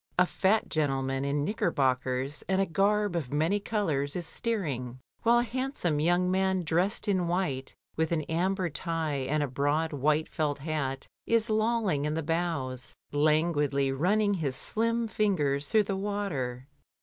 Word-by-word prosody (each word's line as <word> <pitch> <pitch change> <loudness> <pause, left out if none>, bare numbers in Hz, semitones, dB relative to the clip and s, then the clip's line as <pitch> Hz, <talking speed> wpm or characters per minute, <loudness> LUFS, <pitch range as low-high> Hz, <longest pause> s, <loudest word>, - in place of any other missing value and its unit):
A 180 - +6
fat 200 +4 +1
gentleman 135 -3 0
in 140 +1 0
knickerbockers 135 - 0
and 190 0 +2
a 195 - +3
garb 205 +2 +1
of 150 -7 -3
many 160 +8 +1
colours 160 -10 -1
is 175 -2 -3
steering, 140 - -3 0.2
while 235 +1 +4
a 240 - +3
handsome 245 - -1
young 175 +3 +2
man 190 -1 +1
dressed 175 +7 +1
in 185 -4 +1
white 160 -7 -1 0.2
with 160 0 0
an 160 -2 +1
amber 180 +4 0
tie 155 -4 -2
and 150 0 +1
a - - -1
broad 145 +5 0
white 150 +3 +1
felt 150 -2 -1
hat 140 -3 -3 0.2
is 230 0 +2
lolling 215 -9 +1
in 150 0 -1
the 160 - -2
bows, 145 -6 -2 0.2
languidly 145 -2 +2
running 205 +9 +2
his 150 -8 -1
slim 230 +8 -1
fingers 150 -11 +1
through 215 -1 +4
the 195 -1 -2
water. 180 -12 -3
160 Hz, 155 wpm, -29 LUFS, 140-195 Hz, 0.2 s, A